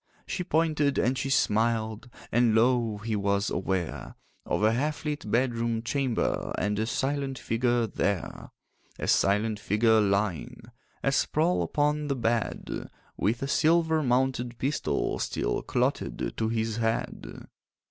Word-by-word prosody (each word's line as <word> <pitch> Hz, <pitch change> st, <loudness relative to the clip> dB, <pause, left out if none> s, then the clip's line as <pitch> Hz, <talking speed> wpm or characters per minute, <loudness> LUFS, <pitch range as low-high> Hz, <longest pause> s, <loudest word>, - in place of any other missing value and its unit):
She 180 Hz, -, -3 dB
pointed 155 Hz, -4 st, +1 dB
and 125 Hz, +2 st, +2 dB
she 135 Hz, -, -2 dB
smiled, 110 Hz, -1 st, +1 dB, 0.2 s
And 120 Hz, -2 st, +3 dB
lo! 115 Hz, -2 st, +3 dB
he 110 Hz, +1 st, -3 dB
was 100 Hz, 0 st, 0 dB
aware 95 Hz, -3 st, -3 dB, 0.3 s
Of -, -, 0 dB
a 110 Hz, -, +5 dB
half 145 Hz, +7 st, -1 dB
lit 150 Hz, -7 st, -3 dB
bedroom 115 Hz, -1 st, 0 dB
chamber 130 Hz, -1 st, -1 dB
And 105 Hz, +1 st, 0 dB
a 110 Hz, -, 0 dB
silent 135 Hz, +1 st, -1 dB
figure 120 Hz, 0 st, +1 dB
there. 100 Hz, -3 st, -2 dB, 0.5 s
A -, -, -4 dB
silent 105 Hz, +2 st, +2 dB
figure 110 Hz, +2 st, +3 dB
lying 100 Hz, -4 st, -1 dB, 0.4 s
A 135 Hz, -, +2 dB
sprawl 160 Hz, +5 st, +1 dB
upon 150 Hz, 0 st, 0 dB
a 140 Hz, -, +1 dB
bed, 115 Hz, -2 st, -2 dB, 0.3 s
With 115 Hz, +6 st, 0 dB
a -, -, -1 dB
silver 160 Hz, +2 st, +3 dB
mounted 125 Hz, -2 st, 0 dB
pistol 135 Hz, +3 st, -1 dB
Still -, -, -1 dB
clotted -, -, -1 dB
to 110 Hz, -1 st, -1 dB
his 110 Hz, -1 st, -1 dB
head. 115 Hz, 0 st, -3 dB
115 Hz, 135 wpm, -28 LUFS, 110-135 Hz, 0.5 s, a